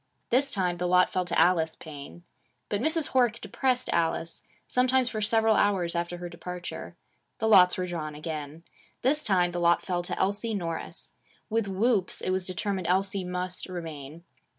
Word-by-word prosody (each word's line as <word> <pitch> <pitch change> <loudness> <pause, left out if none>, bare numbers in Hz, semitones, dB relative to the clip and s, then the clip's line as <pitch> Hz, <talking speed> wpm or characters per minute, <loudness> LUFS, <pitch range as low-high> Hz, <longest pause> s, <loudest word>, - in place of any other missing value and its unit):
This 270 +3 +3
time 180 -7 0
the 180 +1 -1
lot 180 0 +4
fell 185 -1 0
to 175 -1 0
Alice 165 -3 +3
Paine. 155 +2 -10 0.5
But 205 0 -1
Mrs. 315 +1 0
Horick 240 -3 +2
depressed 255 -1 0
Alice, 165 0 -1 0.2
sometimes 255 0 +2
for 215 -3 -3
several 220 +1 +3
hours 190 -5 +2
after 175 +1 -2
her 175 0 -6
departure. 175 +1 -7 0.4
The 220 - 0
lots 185 -4 +7
were 185 - -1
drawn 155 -4 -4
again. 155 0 -6 0.4
This 290 +4 +2
time 180 -6 +2
the 175 - -3
lot 170 0 +3
fell 180 -2 -1
to 175 - -4
Elsie 205 +3 0
Norris. 165 -4 -5 0.4
With 225 -2 +1
whoops, 195 0 +1
it - - -1
was 185 -1 -1
determined 185 -1 -2
Elsie 190 +1 +1
must 180 +1 -4
remain. 160 -3 -7
180 Hz, 170 wpm, -28 LUFS, 170-215 Hz, 0.5 s, lots